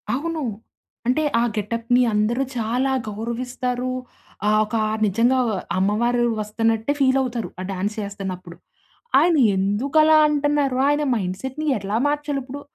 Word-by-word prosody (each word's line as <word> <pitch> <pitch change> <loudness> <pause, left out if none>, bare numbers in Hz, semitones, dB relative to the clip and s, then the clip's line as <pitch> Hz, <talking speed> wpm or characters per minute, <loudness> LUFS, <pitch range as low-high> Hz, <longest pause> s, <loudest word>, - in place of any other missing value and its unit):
అవును. 320 +2 -3 0.6
అంటే 255 +5 +2 0.2
ఆ - - +3
గెటప్‌ని 230 +4 +1
అందరూ 220 +5 +1
చాలా 245 +4 0 0.2
గౌరవిస్తారు. 245 +3 -3 0.6
ఆహ్, 215 0 +4
ఒక 215 +2 -5 0.3
నిజంగా 230 +6 +2
వ - - 0 0.3
అమ్మవారు 235 +5 +1 0.2
వస్తున్నట్టే 225 +3 0
ఫీలవుతారు. 260 -4 +1
ఆ - - -4
డాన్సేస్తన్నప్పుడు. 195 -2 -5 0.6
ఆయన 335 +3 +4 0.2
ఎందుకలా 275 +11 +3
అంటన్నారు, 290 -2 +1
ఆయన 290 +1 +2
మైండ్‌సెట్‌ని 240 +9 -4
ఎట్లా 200 +1 -3
మార్చాలుప్పుడు? 285 -2 -3
240 Hz, 110 wpm, -22 LUFS, 210-275 Hz, 0.6 s, ఆహ్